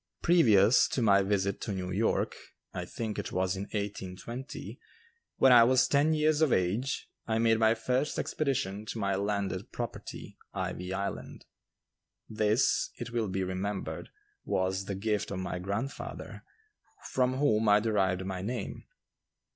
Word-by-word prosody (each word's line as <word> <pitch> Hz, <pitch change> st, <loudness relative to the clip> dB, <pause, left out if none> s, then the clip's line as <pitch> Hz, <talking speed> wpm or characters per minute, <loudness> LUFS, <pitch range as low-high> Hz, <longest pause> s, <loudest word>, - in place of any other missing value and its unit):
Previous 115 Hz, -, +5 dB
to 130 Hz, -, -2 dB
my 100 Hz, -2 st, +5 dB
visit 100 Hz, 0 st, 0 dB
to -, -, -3 dB
New 95 Hz, -2 st, -3 dB
York, 105 Hz, +5 st, +1 dB, 0.4 s
I -, -, -4 dB
think 110 Hz, -3 st, -4 dB
it -, -, -5 dB
was 95 Hz, +1 st, 0 dB
in 95 Hz, +1 st, -4 dB
1820, 105 Hz, +7 st, -6 dB, 0.6 s
when 135 Hz, -, +6 dB
I 120 Hz, -2 st, +9 dB
was 130 Hz, +2 st, +4 dB
ten 150 Hz, +3 st, +3 dB
years 155 Hz, 0 st, +2 dB
of 155 Hz, -5 st, +4 dB
age, 105 Hz, +10 st, 0 dB, 0.2 s
I 110 Hz, -1 st, +1 dB
made 115 Hz, 0 st, +3 dB
my 110 Hz, 0 st, +4 dB
first 125 Hz, +6 st, -1 dB
expedition 110 Hz, -8 st, -2 dB
to -, -, -4 dB
my 100 Hz, -2 st, 0 dB
landed 100 Hz, +1 st, -2 dB
property, 120 Hz, -2 st, -7 dB, 0.2 s
"Ivy 90 Hz, +1 st, -3 dB
Island." 100 Hz, +1 st, -5 dB, 0.8 s
This, 110 Hz, +3 st, +2 dB
it 120 Hz, -2 st, -6 dB
will 115 Hz, -2 st, 0 dB
be 95 Hz, 0 st, -2 dB
remembered, 95 Hz, +2 st, -4 dB, 0.3 s
was 95 Hz, +1 st, -1 dB
the 100 Hz, -, -3 dB
gift 105 Hz, +1 st, -1 dB
of 100 Hz, -, -4 dB
my 90 Hz, -1 st, -3 dB
grandfather, 100 Hz, +9 st, -5 dB, 0.7 s
from 130 Hz, 0 st, +2 dB
whom 110 Hz, -6 st, +3 dB
I 105 Hz, 0 st, +6 dB
derived 95 Hz, -4 st, 0 dB
my 95 Hz, -1 st, -4 dB
name. 115 Hz, +1 st, -4 dB
105 Hz, 145 wpm, -30 LUFS, 95-120 Hz, 0.8 s, I